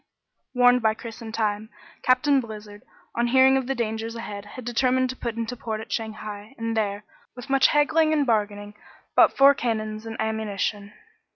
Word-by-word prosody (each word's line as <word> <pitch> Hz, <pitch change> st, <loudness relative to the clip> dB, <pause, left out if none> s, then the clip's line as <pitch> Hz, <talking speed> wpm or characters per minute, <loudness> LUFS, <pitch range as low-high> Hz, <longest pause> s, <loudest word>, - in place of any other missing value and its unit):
Warned 245 Hz, 0 st, +5 dB
by 220 Hz, -1 st, +2 dB
Chris 230 Hz, 0 st, -9 dB
in 225 Hz, -1 st, -7 dB
time, 215 Hz, -1 st, -2 dB, 0.3 s
Captain 260 Hz, +2 st, +3 dB
Blizzard, 210 Hz, -2 st, -10 dB, 0.3 s
on 235 Hz, +1 st, +1 dB
hearing 260 Hz, +2 st, +5 dB
of 265 Hz, -2 st, -1 dB
the 270 Hz, -, -1 dB
dangers 225 Hz, -1 st, -3 dB
ahead, 205 Hz, -3 st, -7 dB
had 235 Hz, +4 st, -10 dB
determined 255 Hz, +1 st, +1 dB
to -, -, -9 dB
put 235 Hz, -3 st, -4 dB
into 230 Hz, +1 st, -4 dB
port 220 Hz, -2 st, -4 dB
at 220 Hz, -1 st, -9 dB
Shanghai, 215 Hz, +1 st, -5 dB
and 230 Hz, 0 st, -3 dB
there, 205 Hz, -2 st, -1 dB, 0.3 s
with 250 Hz, +2 st, -9 dB
much 275 Hz, -1 st, +5 dB
haggling 310 Hz, +2 st, +3 dB
and 300 Hz, -2 st, +2 dB
bargaining, 205 Hz, -3 st, -1 dB, 0.4 s
bought -, -, +5 dB
four 275 Hz, +1 st, +7 dB
cannons 220 Hz, -3 st, -3 dB
and 225 Hz, 0 st, -7 dB
ammunition. 210 Hz, -1 st, -2 dB
225 Hz, 175 wpm, -24 LUFS, 215-255 Hz, 0.4 s, four